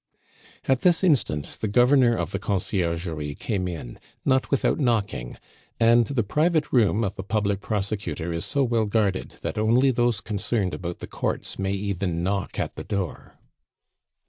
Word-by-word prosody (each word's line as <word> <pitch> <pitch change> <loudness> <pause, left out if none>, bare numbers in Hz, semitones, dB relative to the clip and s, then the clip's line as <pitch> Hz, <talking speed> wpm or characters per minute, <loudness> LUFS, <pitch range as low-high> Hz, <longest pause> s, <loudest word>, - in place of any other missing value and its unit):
At 130 -1 +2
this 175 0 +3
instant 100 - +1
the 110 - 0
governor 125 +2 +4
of - - -2
the 100 - -2
Conciergerie 85 -6 -2
came 95 -2 -2
in, 80 -9 -7 0.3
not 130 -1 +2
without 140 +3 +1
knocking; 110 - -1 0.4
and 115 0 +5
the 135 -5 0
private 155 - +1
room 115 -2 +3
of 100 -2 -3
a - - -2
public 100 -1 0
prosecutor 95 -7 -2
is 85 - -2
so 140 -1 +1
well 115 -3 +1
guarded, 100 -3 0
that - - -2
only 120 +5 +4
those 120 -3 +1
concerned 100 -2 -1
about 85 -1 -5
the - - -5
courts - - -3
may 95 0 0
even 95 -4 -2
knock 100 +1 -2
at - - -2
the - - -5
door. 100 -5 -4
105 Hz, 160 wpm, -25 LUFS, 95-120 Hz, 0.4 s, and